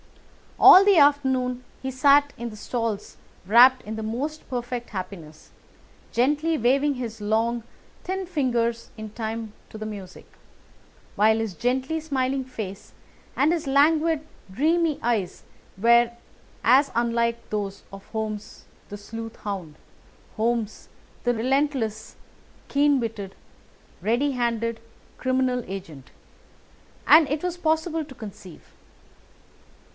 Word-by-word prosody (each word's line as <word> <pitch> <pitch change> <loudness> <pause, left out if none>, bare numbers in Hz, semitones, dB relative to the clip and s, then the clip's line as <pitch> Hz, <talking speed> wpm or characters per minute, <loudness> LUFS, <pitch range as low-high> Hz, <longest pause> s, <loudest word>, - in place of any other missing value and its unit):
All 375 - +10
the 400 -3 +5
afternoon 260 -4 +3 0.2
he 265 - -3
sat 280 +2 +4
in 235 0 -5
the 215 - -10
stalls 220 -1 -4 0.3
wrapped 250 +6 +6
in 215 +1 -6
the 220 - -5
most 275 +8 -4
perfect 245 -1 -4
happiness, 180 -6 -8 0.6
gently 295 +6 +1
waving 275 +4 +2
his 230 -3 -6
long, 225 +3 0 0.4
thin 380 +1 -3
fingers 240 -8 -1
in 215 -1 -7
time 220 -1 -5 0.2
to - - -9
the 215 - -6
music, 200 -4 -8 0.9
while 220 +2 +4
his 225 -3 -2
gently 260 - -1
smiling 270 -3 -1
face 210 -6 -8 0.4
and 290 +4 +3
his 335 -2 -1
languid, 305 +3 +3 0.3
dreamy 315 - +1
eyes 220 -6 -1 0.3
were 235 +3 +4 0.5
as 265 +4 +5
unlike 235 0 0
those 200 -2 -3
of 195 0 -10
Holmes 215 -2 -5 0.2
the 205 - -7
sleuth 225 +2 -8
hound, 185 -7 -6 0.6
Holmes 225 -1 -2 0.3
the 245 - +2
relentless, 245 -3 -1 0.5
keen 285 0 +3
witted, 210 -5 -5 0.7
ready 245 +7 +1
handed 230 -2 -1 0.4
criminal 255 -1 0
agent, 165 -8 -8 1.0
as 315 -1 +7
it 295 +3 -2
was 360 -1 -2
possible 320 -1 0
to 275 -3 -13
conceive. 195 -7 -11
240 Hz, 120 wpm, -24 LUFS, 220-280 Hz, 1.0 s, All